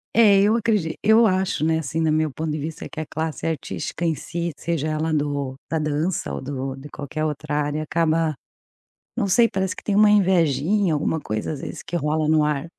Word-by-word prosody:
É 205 -4 +6
eu 215 +2 +4
acred 210 -8 +1
eu 220 +2 +5
acho 185 -5 +1
né, 160 0 +2
assim, 160 +2 -3
no 160 -1 +2
meu 155 -1 +1
ponto 155 +2 -3
de 150 - -2
vista, 155 +2 -5
que - - -8
a 155 - -3
classe 160 +1 -3
artística 165 +1 -3
em 165 - +2
si 170 +1 -4
seja 165 -3 -2
ela 155 +1 -1
do 145 -3 -1
da 160 - -1
dança 155 +4 -1
ou - - -4
do 135 -1 -4
de 135 +2 -10
qualquer 150 +2 -4
outra 150 0 -3
área 145 +1 -2
acaba, 160 -1 +1 0.8
não 215 -5 +1
sei, 230 +5 +4
parece 190 -1 -2
que - - -11
tem 205 -1 0
uma 210 0 +6
invejinha, 185 -1 +3
alguma 155 +2 0
coisa, 110 +6 -3
às 140 - -6
vezes, - - -7
que 175 - -4
rola 155 0 0
no 155 -1 +4
ar. 150 +1 -1
160 Hz, 210 wpm, -23 LUFS, 150-180 Hz, 0.8 s, É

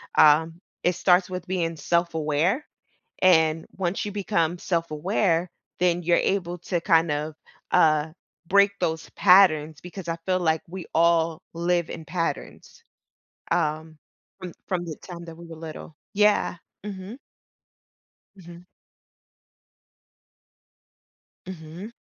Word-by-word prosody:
um, 160 +3 +5 0.2
it 180 - +3
starts 180 0 +3
with 185 -1 -5
being 170 -3 -1
self-aware, 170 - 0 0.6
and 160 -3 +4
once 185 +1 -2
you 205 - -5
become 180 -4 0
self-aware, 170 +1 0 0.3
then 175 0 +2
you're 170 +1 +3
able 180 -2 -1
to 175 +1 -2
kind 165 -1 +3
of, 150 +1 -2 0.4
uh, 155 -3 +3 0.3
break 200 +2 +4
those 160 0 -2
patterns 160 -6 +5
because 180 0 -9
I 165 - -1
feel 185 0 +2
like 160 -2 +1
we 180 -1 -7
all 165 0 +3
live 170 0 0
in 160 - -7
patterns, 165 +1 -5 0.7
um, 160 -2 -1 0.4
from 180 -3 -7 0.2
from 175 -2 -1
the 160 -2 -5
time 170 -2 -10
that 165 - -10
we 170 0 -11
were 165 - -9
little, 160 -1 -9 0.2
yeah. 210 -3 +3 0.3
Mhm. 200 +4 -7 1.2
Mhm. 175 -1 -13 2.8
Mhm. 180 +4 -8
170 Hz, 115 wpm, -25 LUFS, 160-185 Hz, 2.8 s, um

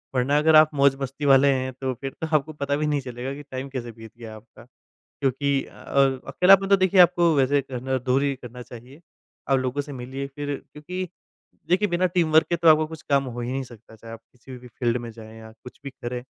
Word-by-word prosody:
वरना 130 +3 +2
अगर 155 +1 +4
आप 155 0 +7
मौज-मस्ती 140 0 0
वाले 135 0 +5
हैं 130 0 -3
तो 130 -1 -1
फिर 135 -1 -4
तो 160 - -2
आपको 150 +2 -6
पता 140 -1 -2
भी 150 +1 -1
नहीं 145 -2 0
चलेगा 125 +1 -6
कि 145 +1 -9
टाइम 130 +1 -5
कैसे 125 -3 -6
बीत 110 -1 -13
गया 115 -2 -9
है - - -10
आपका। 110 +1 -16 0.4
क्योंकि 140 0 -1
अ, - - -16 0.5
अकेलापन 195 +1 +5
तो 200 - +6
देखिए 185 0 +2
आपको 175 -1 +4
वैसे 140 +1 +2
करना 130 0 -3
दूर 130 +2 0
ही 140 -1 0
करना 125 -1 -11
चाहिए। 125 +5 -13 0.5
आप 135 - +4
लोगों 130 +2 -2
से 145 0 -9
मिलिए 130 +2 -6
फिर 145 +1 -5 0.2
क्योंकि 180 +5 -6 0.6
देखिए 190 +4 +2
बिना 175 0 0
टीमवर्क 165 -3 +2
के 170 - +1
तो 170 0 0
आपको 155 0 +5
कुछ 160 -1 -10
काम 140 -1 +3
हो 120 -1 -6
ही 120 +1 -4
नहीं 135 +1 -2
सकता 115 -2 -15
चाहे 115 +1 -11
आप 115 - -9
किसी 125 +1 -12
भी 125 0 -13
फील्ड 120 +1 -1
में 120 - -7
जाए 110 0 -13
या 110 0 -12
कुछ 115 +3 -15
भी 140 - -6
करें। 120 -1 -6
135 Hz, 225 wpm, -24 LUFS, 125-150 Hz, 0.6 s, आप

